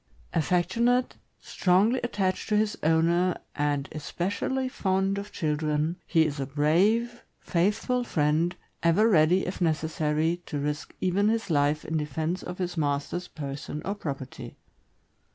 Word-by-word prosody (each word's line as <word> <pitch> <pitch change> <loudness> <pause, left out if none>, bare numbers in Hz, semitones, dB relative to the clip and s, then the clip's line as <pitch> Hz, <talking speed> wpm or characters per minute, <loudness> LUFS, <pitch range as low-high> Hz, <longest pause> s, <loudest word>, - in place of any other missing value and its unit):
Affectionate, 190 - +1 0.2
strongly 200 +7 +2
attached 195 -6 -1
to 210 - +3
his 210 0 +1
owner, 170 +3 +2 0.2
and 145 -1 0
especially 200 - -2
fond 195 -4 0
of 205 +1 -8
children, 155 0 0
he 160 -1 +4
is 145 -2 -3
a 135 - -2
brave, 195 - +2 0.2
faithful 210 +8 0
friend, 160 -2 +1 0.3
ever 170 +7 +4
ready, 180 -1 +4
if 185 - -5
necessary, 160 0 0
to 145 - -3
risk 145 +1 -3
even 195 +3 +2
his 225 -4 -1
life 145 0 +2
in 160 - -1
defense 155 +4 -2
of 180 0 -7
his 180 -2 -3
master' 145 +1 0
s 180 0 -7
person 145 0 -6
or 200 - -1
property. 140 -9 -6
170 Hz, 135 wpm, -27 LUFS, 150-200 Hz, 0.3 s, he